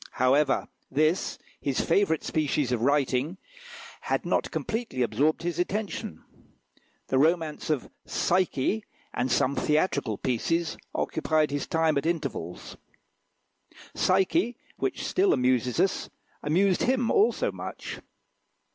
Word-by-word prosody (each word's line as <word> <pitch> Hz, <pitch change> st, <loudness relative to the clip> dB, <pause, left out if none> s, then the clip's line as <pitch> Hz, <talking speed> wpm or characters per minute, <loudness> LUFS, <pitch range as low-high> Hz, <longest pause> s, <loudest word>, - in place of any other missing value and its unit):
However, 135 Hz, +2 st, +2 dB, 0.2 s
this, 155 Hz, +6 st, +1 dB, 0.2 s
his 135 Hz, -2 st, -1 dB
favourite 165 Hz, -2 st, +2 dB
species 150 Hz, -4 st, 0 dB
of 120 Hz, -3 st, 0 dB
writing, 140 Hz, +4 st, +1 dB, 0.6 s
had -, -, -1 dB
not -, -, +1 dB
completely 220 Hz, -, -2 dB
absorbed 140 Hz, +9 st, +1 dB
his 175 Hz, -1 st, -2 dB
attention; 190 Hz, -, -3 dB, 0.9 s
the 130 Hz, -, +3 dB
romance 160 Hz, 0 st, +1 dB
of 150 Hz, -5 st, 0 dB, 0.2 s
"Psyche," 185 Hz, +2 st, +1 dB, 0.3 s
and 125 Hz, +1 st, -1 dB
some 135 Hz, +3 st, +2 dB
theatrical 150 Hz, -, +1 dB
pieces, 165 Hz, +7 st, 0 dB, 0.2 s
occupied 155 Hz, -2 st, +1 dB
his 145 Hz, -1 st, -2 dB
time 160 Hz, -3 st, +2 dB
at 145 Hz, -, -3 dB
intervals. 140 Hz, -, -4 dB, 1.2 s
"Psyche," 195 Hz, -, +2 dB, 0.2 s
which -, -, -2 dB
still 380 Hz, +1 st, +3 dB
amuses 125 Hz, -1 st, +1 dB
us, 190 Hz, -, +1 dB, 0.3 s
amused 180 Hz, +5 st, +2 dB
him 250 Hz, -2 st, +2 dB
also 420 Hz, +2 st, +3 dB
much. -, -, -7 dB
155 Hz, 110 wpm, -27 LUFS, 130-185 Hz, 1.2 s, the